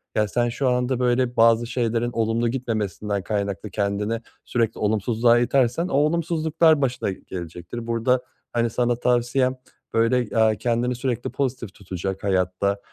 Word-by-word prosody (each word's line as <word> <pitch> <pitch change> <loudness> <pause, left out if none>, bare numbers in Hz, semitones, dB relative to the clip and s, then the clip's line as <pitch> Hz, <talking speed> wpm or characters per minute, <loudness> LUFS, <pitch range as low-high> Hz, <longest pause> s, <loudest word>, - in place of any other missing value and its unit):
Ya, 105 0 +2
sen 120 +2 0
şu 130 +2 0
anda, 125 0 0
böyle, 125 0 +1
bazı 115 0 +4
şeylerin 120 -1 -1
olumlu 115 +1 0
gitmemesinden 105 -5 -2
kaynaklı 100 +1 -3
kendini 105 +3 -1 0.2
sürekli 115 -3 -1
olumsuzluğa 110 +3 +2
itersen 130 +6 +2
o - - -5
olumsuzluklar 160 0 +2
başına 125 -6 0
gelecektir. 90 +6 -7
Burada, 115 +2 +1 0.3
hani, 120 -1 +1
sana 120 +1 +1
tavsiyem, 125 +2 +1 0.4
böyle, 115 +1 +1
aaa, 110 -1 +4
kendini 120 +3 0
sürekli 125 -1 -2
pozitif 125 -5 -3
tutacak 95 0 -5
hayatta, 95 +1 0
115 Hz, 135 wpm, -23 LUFS, 105-125 Hz, 0.4 s, bazı